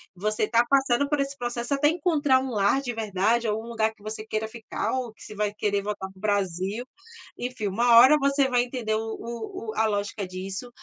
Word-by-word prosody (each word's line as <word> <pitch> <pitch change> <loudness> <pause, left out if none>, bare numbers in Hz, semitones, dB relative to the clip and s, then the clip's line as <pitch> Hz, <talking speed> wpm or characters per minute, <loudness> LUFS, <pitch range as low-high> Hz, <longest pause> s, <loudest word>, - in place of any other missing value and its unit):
você 215 +4 -1
está 230 +2 +3
passando 275 0 +3
por 290 -1 +1
esse 275 0 -3
processo 240 +1 -3
até 285 +1 +3
encontrar 300 -5 +2
um 265 - -4
lar 205 +5 +2
de 255 -3 -3
verdade 220 +2 0
ou 215 +1 -1
um - - -10
lugar 220 -1 0
que 210 - -22
você 215 0 -5
queira 215 0 -2
ficar 225 0 -4
ou 255 -4 -3
que - - -15
você - - -9
vai 210 0 -1
querer 205 -1 0
voltar 200 -2 -4
para 190 - -20
o - - -15
Brasil, 200 +1 -1 0.5
enfim, 245 -4 -3
uma 235 +5 +3
hora 260 +6 +9
você 275 -1 +2
vai 245 -1 +3
entender 245 -3 -2
o - - 0 0.2
o 230 -1 -6
o - - -11
a 220 - +2
lógica 205 -1 -2
disso, 190 +5 -6
225 Hz, 220 wpm, -26 LUFS, 210-255 Hz, 0.5 s, hora